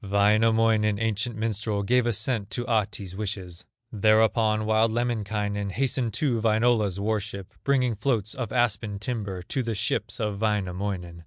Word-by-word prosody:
Wainamoinen, 105 +1 +3
ancient 115 +1 -1
minstrel, 105 -1 -2
Gave 125 +3 +2
assent 110 -2 -1
to 120 - -3
Ahti's 105 -5 -1
wishes; 95 -4 -5 0.3
Thereupon 110 0 +3
wild 110 +1 +3
Lemminkainen 105 -3 -1
Hastened 120 +2 -1
to 125 -7 0
Wainola's 110 -3 +2
war 110 +1 0
ship, 100 -2 -8
Bringing 130 -3 +2
floats 110 -2 -1
of 120 -5 -5
aspen 110 -4 0
timber, 100 -4 -4
To 130 - -2
the 115 -2 -2
ships - - -2
of 105 -2 -2
Wainamoinen. 95 -4 -2
110 Hz, 140 wpm, -26 LUFS, 100-115 Hz, 0.3 s, Wainamoinen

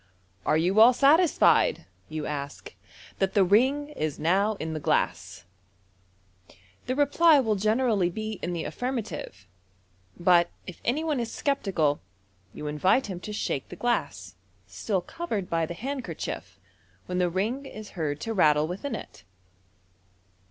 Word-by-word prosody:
"Are 155 - +4
you 180 +6 +2
all 235 +3 +8
satisfied," 305 +6 +4 0.2
you 155 -1 -4
ask, 140 -1 -6 0.5
"that 195 +3 0
the 200 - +6
ring 260 +10 +3
is 155 - -3
now 195 +7 +2
in 160 -4 -5
the 155 - -3
glass? 145 - -1 1.4
The 255 - 0
reply 290 +2 +5
will 225 -5 +1
generally 215 -2 +1
be 215 +2 -5
in 175 - -3
the 165 -2 -3
affirm 255 +2 -3
ative; 100 - -6 0.7
but, 175 0 +4 0.2
if 180 - -10
any 280 +7 0
one 305 -5 0
is 230 -1 -3
sceptical, 185 - 0 0.5
you 150 - -8
invite 185 - +1
him 180 - -5
to 210 - -7
shake 175 -9 -3
the - - -8
glass, 240 - -2 0.3
still 140 - -2
covered 230 - -5
by 165 -1 +1
the 170 - -6
handkerchief, 265 +6 -5 0.5
when 180 0 -2
the 180 -1 +2
ring 225 +10 -2
is 215 -4 -10
heard 150 -4 -3
to 225 - -3
rattle 150 -5 +3
within 195 - -4
it. 105 -2 -10
195 Hz, 145 wpm, -27 LUFS, 165-250 Hz, 1.4 s, all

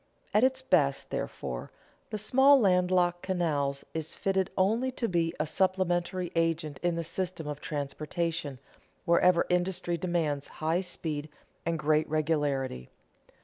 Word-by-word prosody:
At 210 - +4
its 260 0 +2
best, 145 - +2
therefore, 60 -1 -4 0.4
the 215 - -3
small 265 +6 +5
land 180 -4 +3
locked 175 -1 +2
canal 155 -7 0 0.2
is 160 -1 -4
fitted 190 -1 0
only 225 +7 +2
to 235 - -1
be 170 -3 +1
a 155 - +1
supplementary 180 0 0
agent 165 -3 0
in 175 -1 +1
the 170 - -2
system 175 0 -3
of 150 -1 -5
transportation 150 +1 -3 0.5
wherever 170 0 +4
industry 175 -1 0
demands 160 -5 -1
high 160 +3 +1
speed 155 -4 -3 0.4
and 165 0 +1
great 155 0 +2
regularity. 145 - -1
170 Hz, 135 wpm, -29 LUFS, 155-185 Hz, 0.5 s, small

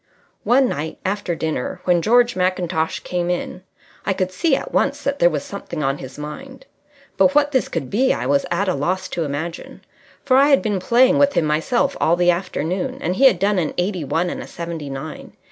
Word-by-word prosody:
One 260 +2 +4
night 155 -5 -4
after 190 -2 -1
dinner 155 -6 -3
when 175 -2 +2
George 240 +4 +3
Mackintosh 180 -3 -1
came 175 -1 -2
in, 180 +1 -3 0.4
I 195 - 0
could 185 -1 -2
see 275 - +1
at - - -6
once - - 0
that 280 0 -1
there 175 - +5
was 150 -4 -3
something 170 -5 -6
on 135 0 -1
his 130 -1 -9
mind, 265 - -9 0.5
but 280 - +4
what 290 0 +4
this 260 -3 +1
could 130 - -4
be 255 +6 +2
I 120 - -2
was 140 +1 +2
at 190 +3 0
a 185 - +2
loss 185 +6 -1
to 165 - -2
imagine, 155 +4 -6 0.4
for 255 - +4
I 275 +1 +6
had 275 - +4
been 205 -4 0
playing 255 +8 +4
with 285 0 +4
him 165 - +1
myself 200 - 0
all 165 - +4
the 175 0 +4
afternoon, 185 - -3
and 185 -10 -2
he 270 - +4
had 235 -9 +6
done 200 +1 +1
an 160 -4 -2
eighty 180 -1 -1
one 165 +5 -1
and - - -5
a - - -9
seventy 165 -4 -6
nine. 135 +3 -7
180 Hz, 215 wpm, -20 LUFS, 160-245 Hz, 0.5 s, I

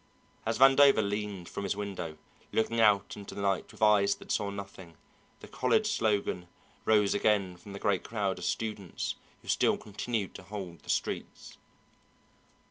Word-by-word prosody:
As 115 0 0
Vandover 135 -4 +6
leaned 100 -3 -3
from 100 - -5
his 100 - -1
window, 95 -6 -5 0.3
looking 115 +1 +1
out 105 -3 +4
into 100 -1 -9
the 100 - -4
night 100 -1 0
with - - -5
eyes 100 -2 +5
that - - -9
saw 100 - 0
nothing, 100 -4 -9 0.4
the - - -10
college 215 - +1
slogan 100 - 0 0.4
rose 105 -2 +4
again 100 -3 +2
from 95 +3 -12
the 100 - -6
great 100 -2 +1
crowd 100 -4 -2
of 90 - -5
students 105 -3 -3 0.3
who - - -17
still - - +3
continued 105 0 -3
to - - -9
hold 95 -3 -7
the - - -17
streets. - - -3
100 Hz, 160 wpm, -30 LUFS, 95-110 Hz, 0.4 s, Vandover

